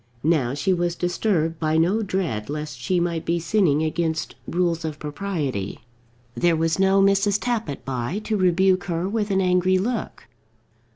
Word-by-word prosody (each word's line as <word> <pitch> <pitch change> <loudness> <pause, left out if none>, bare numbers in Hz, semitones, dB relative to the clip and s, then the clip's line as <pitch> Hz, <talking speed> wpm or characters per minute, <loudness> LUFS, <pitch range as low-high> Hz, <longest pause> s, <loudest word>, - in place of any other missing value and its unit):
Now 140 -5 +2
she 185 +6 +1
was 175 -1 0
disturbed 175 -3 0
by 155 0 +1
no 180 +7 +2
dread 180 - -2
lest 150 -2 -5
she 175 +9 0
might 170 -2 -1
be 170 +1 0
sinning 160 -3 +2
against 160 0 -1
rules 170 -1 0
of 155 -2 -4
propriety. 150 - -3 0.6
There 175 +3 +2
was 165 +2 0
no 195 0 +4
Mrs. 200 +1 +3
Tappitt 225 - -3
by, 130 +6 -2
to 220 - -1
rebuke 185 0 +3
her 175 -1 -2
with 210 0 -1
an 195 -1 +2
angry 180 0 +3
look. 225 +4 -3
175 Hz, 160 wpm, -23 LUFS, 155-190 Hz, 0.6 s, no